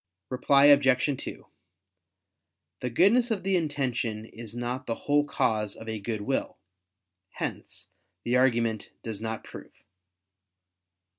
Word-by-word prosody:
Reply 140 Hz, +2 st, +4 dB
Obj. 140 Hz, -1 st, +5 dB
2: -, -, -8 dB, 1.3 s
The 125 Hz, -, -2 dB
goodness 215 Hz, -, +4 dB
of 205 Hz, -5 st, -1 dB
the 195 Hz, 0 st, +1 dB
intention 130 Hz, -9 st, -1 dB
is 115 Hz, 0 st, -10 dB
not 125 Hz, +2 st, -4 dB
the 115 Hz, -, -1 dB
whole 145 Hz, +3 st, +1 dB
cause 110 Hz, -7 st, 0 dB
of 110 Hz, -, -11 dB
a 110 Hz, -1 st, -3 dB
good 110 Hz, +1 st, -3 dB
will. 135 Hz, +6 st, -2 dB, 0.8 s
Hence -, -, -5 dB, 0.4 s
the 120 Hz, -, 0 dB
argument 115 Hz, -4 st, +2 dB
does 110 Hz, -2 st, -5 dB
not 110 Hz, 0 st, -4 dB
prove. -, -, -12 dB
125 Hz, 125 wpm, -27 LUFS, 115-145 Hz, 1.3 s, Obj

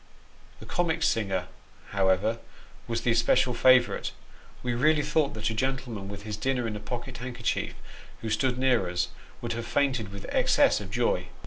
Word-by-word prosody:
The -, -, -10 dB
comic 170 Hz, -2 st, 0 dB
singer, 95 Hz, -, +1 dB, 0.5 s
however, 100 Hz, +3 st, +2 dB, 0.5 s
was 115 Hz, 0 st, -1 dB
the 120 Hz, -, +2 dB
especial 115 Hz, +2 st, +3 dB
favourite; 130 Hz, +1 st, +4 dB, 0.5 s
we 125 Hz, -1 st, 0 dB
really 150 Hz, +5 st, +3 dB
thought 150 Hz, -2 st, +1 dB
that 110 Hz, +1 st, -1 dB
a -, -, -2 dB
gentleman, 120 Hz, -4 st, -2 dB
with 100 Hz, 0 st, -7 dB
his 105 Hz, -1 st, -4 dB
dinner 125 Hz, +2 st, 0 dB
in 110 Hz, -2 st, -3 dB
a -, -, -4 dB
pocket 120 Hz, +4 st, -6 dB
handkerchief, 125 Hz, -2 st, -2 dB, 0.5 s
who 110 Hz, -, -3 dB
stood 130 Hz, 0 st, +1 dB
near 125 Hz, -8 st, +2 dB
us, 90 Hz, 0 st, -1 dB, 0.3 s
would 115 Hz, -1 st, -2 dB
have 115 Hz, 0 st, -5 dB
fainted 130 Hz, -8 st, 0 dB
with 100 Hz, 0 st, -8 dB
excess -, -, +4 dB
of -, -, -7 dB
joy. -, -, 0 dB
120 Hz, 165 wpm, -28 LUFS, 105-130 Hz, 0.5 s, favourite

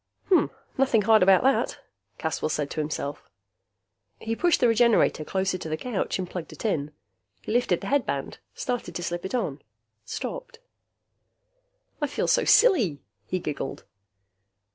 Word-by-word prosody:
"Nothing 245 Hz, -5 st, +3 dB
hard 220 Hz, +1 st, +5 dB
about 190 Hz, 0 st, +6 dB
that," 270 Hz, +1 st, +2 dB, 0.4 s
Caswell 160 Hz, -1 st, -2 dB
said 150 Hz, -2 st, -2 dB
to -, -, -4 dB
himself. 150 Hz, -1 st, -4 dB, 0.9 s
He 225 Hz, +1 st, -3 dB
pushed 345 Hz, +5 st, +2 dB
the 245 Hz, -, +4 dB
Regenerator 230 Hz, -8 st, +3 dB
closer 190 Hz, +2 st, -1 dB
to 160 Hz, -, -6 dB
the 155 Hz, -, -1 dB
couch 230 Hz, -3 st, -2 dB
and 185 Hz, -1 st, -3 dB
plugged 175 Hz, -2 st, -6 dB
it -, -, -9 dB
in. 150 Hz, -9 st, 0 dB, 0.5 s
He -, -, -5 dB
lifted 230 Hz, -7 st, +1 dB
the -, -, -6 dB
headband, 190 Hz, -, -1 dB, 0.2 s
started 245 Hz, -9 st, -3 dB
to 175 Hz, -, -3 dB
slip 175 Hz, +1 st, -3 dB
it 190 Hz, -, -3 dB
on, 150 Hz, -, -2 dB, 0.4 s
stopped. -, -, -6 dB, 1.4 s
"I 295 Hz, -, +1 dB
feel 285 Hz, -, -2 dB
so -, -, +3 dB
silly!" 220 Hz, -, +4 dB, 0.2 s
he 185 Hz, -, -1 dB
giggled. 150 Hz, -5 st, -5 dB
190 Hz, 145 wpm, -26 LUFS, 155-245 Hz, 1.4 s, about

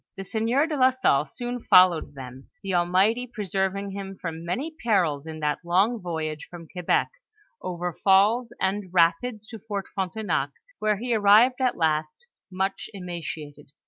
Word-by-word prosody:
The 195 Hz, -, -5 dB
sieur 230 Hz, +8 st, +1 dB
de 320 Hz, -2 st, -3 dB
la 260 Hz, -2 st, +5 dB
Salle 255 Hz, -, +1 dB
soon 245 Hz, 0 st, -5 dB
ibllowed 180 Hz, -8 st, +4 dB
them, 130 Hz, 0 st, -10 dB
the 195 Hz, -1 st, -3 dB
Al 175 Hz, -1 st, +2 dB
mighty 215 Hz, +7 st, +2 dB
preserving 195 Hz, -2 st, -2 dB
him 195 Hz, -1 st, -7 dB
from 165 Hz, -1 st, -5 dB
many 250 Hz, -, -3 dB
perils 170 Hz, -10 st, +1 dB
in 155 Hz, -1 st, -7 dB
that 150 Hz, -1 st, 0 dB
long 195 Hz, +7 st, +2 dB
voyage 160 Hz, -3 st, -4 dB
from 170 Hz, -2 st, -10 dB
Quebec, 180 Hz, +1 st, 0 dB, 0.5 s
over 175 Hz, -1 st, -4 dB
falls 210 Hz, +7 st, +3 dB
and 190 Hz, -1 st, -1 dB
rapids 185 Hz, +6 st, +2 dB
to 225 Hz, -, -8 dB
Fort 200 Hz, -2 st, -5 dB
Frontenac, 190 Hz, -6 st, -2 dB, 0.3 s
where 215 Hz, -1 st, +1 dB
he 240 Hz, +3 st, -2 dB
arrived 220 Hz, +5 st, +5 dB
at 255 Hz, -1 st, +1 dB
last, 155 Hz, -, -1 dB, 0.3 s
much 190 Hz, +1 st, -2 dB
emaciated. 155 Hz, -6 st, -7 dB
190 Hz, 155 wpm, -25 LUFS, 165-220 Hz, 0.5 s, la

